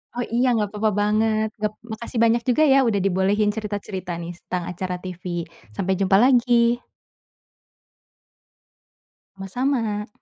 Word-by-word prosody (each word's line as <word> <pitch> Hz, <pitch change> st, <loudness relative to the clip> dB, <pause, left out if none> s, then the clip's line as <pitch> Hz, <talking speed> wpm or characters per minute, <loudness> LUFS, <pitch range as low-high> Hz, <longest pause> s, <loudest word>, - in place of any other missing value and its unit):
Oh, 245 Hz, -, -1 dB
iya 245 Hz, +2 st, +3 dB
gak 210 Hz, -1 st, -1 dB
papa 215 Hz, +1 st, +1 dB
banget. 215 Hz, +1 st, +2 dB
Ngep 215 Hz, 0 st, -1 dB, 0.2 s
makasih 230 Hz, +1 st, -5 dB
banyak 230 Hz, +1 st, +3 dB
juga 305 Hz, +6 st, +4 dB
ya 270 Hz, -, +6 dB
udah 205 Hz, -3 st, +1 dB
dibolehin 200 Hz, +3 st, +2 dB
cerita-cerita, 205 Hz, -3 st, -5 dB
nih, 170 Hz, +1 st, -6 dB
setang 180 Hz, 0 st, -4 dB
acara 180 Hz, +1 st, -4 dB
TV. 180 Hz, -1 st, -8 dB, 0.5 s
Sampai 190 Hz, -, 0 dB
jumpa 195 Hz, 0 st, +3 dB
lagi. 240 Hz, -2 st, +4 dB, 2.6 s
Sama-sama. 215 Hz, +1 st, -2 dB
210 Hz, 125 wpm, -23 LUFS, 195-235 Hz, 2.6 s, ya